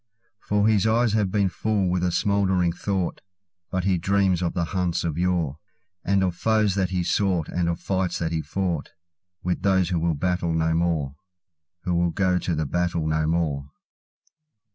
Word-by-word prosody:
For 105 0 +1
his 110 -2 +3
eyes 115 0 +2
have 105 -3 +2
been 100 0 +2
full 100 +1 0
with 90 0 0
a 90 - +1
smouldering 95 -3 +1
thought; 95 0 -2 0.5
But 95 -1 -1
he 95 -2 +1
dreams 95 0 +2
of 85 - -1
the 85 - +1
hunts 90 -2 0
of 80 -3 -2
yore, 85 -4 0 0.4
And 100 0 +2
of 90 -2 0
foes 110 -2 +2
that 95 -2 0
he 90 -2 -1
sought, 90 -3 +1
and 85 -1 0
of 85 +1 -2
fights 95 -2 -1
that 80 -1 -2
he 80 -1 -1
foughtWith 85 +1 -5
those 95 -2 +2
who 90 -3 0
will 85 -1 0
battle 90 +1 0
no 80 0 +1
more—Who 85 +1 -4
will 85 0 +2
go 90 +1 +1
to 85 0 -2
the 80 0 -1
battle 85 +2 -1
no 80 0 +1
more. 75 -4 -1
90 Hz, 175 wpm, -24 LUFS, 85-95 Hz, 0.5 s, his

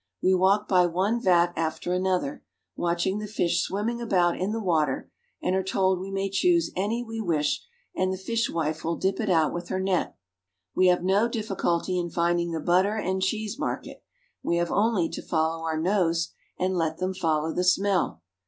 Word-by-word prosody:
We 185 - +3
walk 195 +3 +3
by 180 -2 +4
one 195 +7 0
vat 175 -3 +3
after 160 +2 -2
another, 180 -6 -1 0.3
watching 175 +3 0
the 210 - -5
fish 180 -5 +1
swimming 225 +5 -2
about 180 -6 +2
in 190 +3 -2
the 225 - -2
water, 160 -9 0 0.3
and 185 - +1
are 190 - +2
told 190 -1 +1
we 190 +1 -6
may 195 0 -1
choose 340 - +2
any 215 +6 -1
we 225 -1 -5
wish 155 -7 0 0.3
and 185 0 +1
the 190 - -3
fishwife 170 -7 -1
will 165 +1 -1
dip 190 +2 -1
it 215 -3 -1
out 160 -4 +3
with 175 0 -5
her 185 - -1
net. 190 -1 0 0.6
We 185 - +4
have 180 -1 +3
no 195 +5 +3
difficulty 190 -5 -1
in 175 -1 -2
finding 170 +1 +1
the 165 - -2
butter 185 +6 +2
and 190 -3 -1
cheese 215 +5 -2
market! - - -4 0.4
We 170 - 0
have 170 0 0
only 205 -5 +2
to - - -6
follow 160 0 -1
our 160 -1 -1
noses 170 -2 +1 0.3
and 185 +1 0
let 160 -2 0
them 185 +1 -2
follow 160 -3 0
the 180 - 0
smell. 185 - +1
185 Hz, 190 wpm, -26 LUFS, 170-195 Hz, 0.6 s, by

